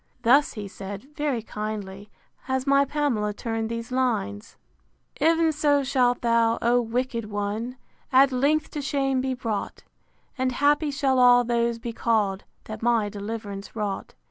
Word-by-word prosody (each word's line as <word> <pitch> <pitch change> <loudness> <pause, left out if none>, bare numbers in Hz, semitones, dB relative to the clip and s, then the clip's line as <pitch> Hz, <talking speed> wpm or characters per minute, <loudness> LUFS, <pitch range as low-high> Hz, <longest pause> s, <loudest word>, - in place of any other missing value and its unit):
Thus 275 +5 +4
he 210 -2 -6
said, 200 +9 -9
very 285 -7 -1
kindly, 210 -2 -6 0.4
has 260 0 -1
my 280 0 +4
Pamela 250 -8 -1
turned 225 -1 -3
these 230 +1 -5
lines: 230 - -2 0.6
IX. - - -27
Ev'n 330 -1 +3
so 290 -2 +2
shalt 250 -2 +1
thou, 230 -1 +3
O 240 +1 +3
wicked 235 0 -2
one! 210 +5 -3 0.3
At 270 +1 +6
length 285 +5 +1
to 295 - -4
shame 270 -2 0
be 260 0 -1
brought; 225 -5 -4 0.6
And 255 0 +1
happy 290 +3 +2
shall 275 -2 +1
all 245 0 +7
those 235 -1 0
be 230 0 -6
call'd, 210 -5 0 0.2
That 215 0 -8
my 230 -3 +1
deliv'rance 205 -1 -6
wrought. 205 -3 -4
240 Hz, 150 wpm, -25 LUFS, 215-270 Hz, 0.6 s, all